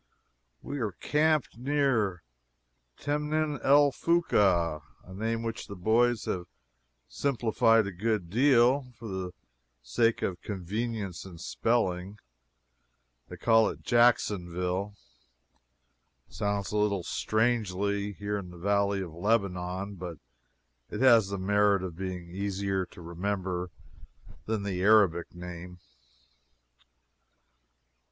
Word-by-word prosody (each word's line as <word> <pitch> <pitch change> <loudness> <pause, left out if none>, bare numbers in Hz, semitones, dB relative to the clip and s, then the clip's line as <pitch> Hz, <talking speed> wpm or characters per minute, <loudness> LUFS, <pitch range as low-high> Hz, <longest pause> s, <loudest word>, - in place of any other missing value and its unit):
We 145 - -5
are 105 -5 -2
camped 150 -5 +1
near 125 -9 +1 0.7
Temnin 150 0 -1
el 145 +1 +6
Foka 95 - +2 0.2
a 95 - -12
name 115 +3 -2
which 115 -1 -4
the 100 - -7
boys 115 +4 +2
have 90 -1 -3 0.6
simplified 115 - +2
a 100 - -4
good 105 0 -1
deal, 125 +1 +3
for 115 - -8
the 95 -2 -4 0.5
sake 115 - +1
of 90 -3 -2
convenience 105 0 -4
in 95 -3 -11
spelling. 95 0 -1 1.1
They - - -8
call 115 -1 +4
it - - -9
Jacksonville. 100 -5 +1 1.3
It 60 - -24
sounds 100 +3 -2
a 105 - -1
little 100 -3 +1
strangely, 100 -2 0
here 100 +1 -3
in 90 -3 -8
the 90 - -12
Valley 100 +1 +1
of 85 -4 -6
Lebanon, 95 0 -1
but 85 -2 -6 0.7
it - - -5
has 115 -6 +6
the 100 - -3
merit 100 0 +2
of 90 -3 -5
being 90 -1 -5
easier 95 0 -2
to - - -14
remember 90 +1 -3 0.8
than 110 -2 -1
the 95 -3 -2
Arabic 95 -5 +4
name. 90 0 -8
100 Hz, 115 wpm, -29 LUFS, 90-115 Hz, 1.3 s, el